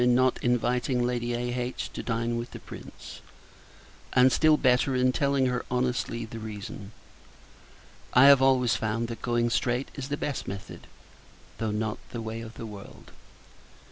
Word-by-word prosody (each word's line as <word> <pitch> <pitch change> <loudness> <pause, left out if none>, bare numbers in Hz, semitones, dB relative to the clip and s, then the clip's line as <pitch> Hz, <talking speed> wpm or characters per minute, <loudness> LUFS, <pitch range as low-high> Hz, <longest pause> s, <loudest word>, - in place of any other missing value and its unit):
in 125 0 +4
not 130 0 +3
inviting 125 +1 +1
Lady 120 -1 -1
A.H. 125 +1 -3
to - - -4
dine 115 0 -1
with 120 +1 -4
the - - -9
Prince; - - -11 0.9
and 130 +1 +6
still 155 +3 +4
better, 130 0 +3
in 125 0 +3
telling 140 +2 +1
her, 125 -1 0
honestly, 125 -2 -1
the 115 0 -8
reason. 105 -1 -7 1.2
I 125 +2 +8
have 140 -1 +8
always 125 -3 +4
found, 110 +2 -1
that 115 -2 -6
going 120 -1 +1
straight 120 +2 0
is 140 -1 -6
the 145 - -1
best 145 -3 -3
method, 100 0 -8 0.7
though 110 - -1
not 105 0 -2
the 120 - -5
way 110 0 -5
of 115 -1 -9
the - - -7
world. 105 -2 -11
120 Hz, 160 wpm, -27 LUFS, 115-125 Hz, 1.2 s, I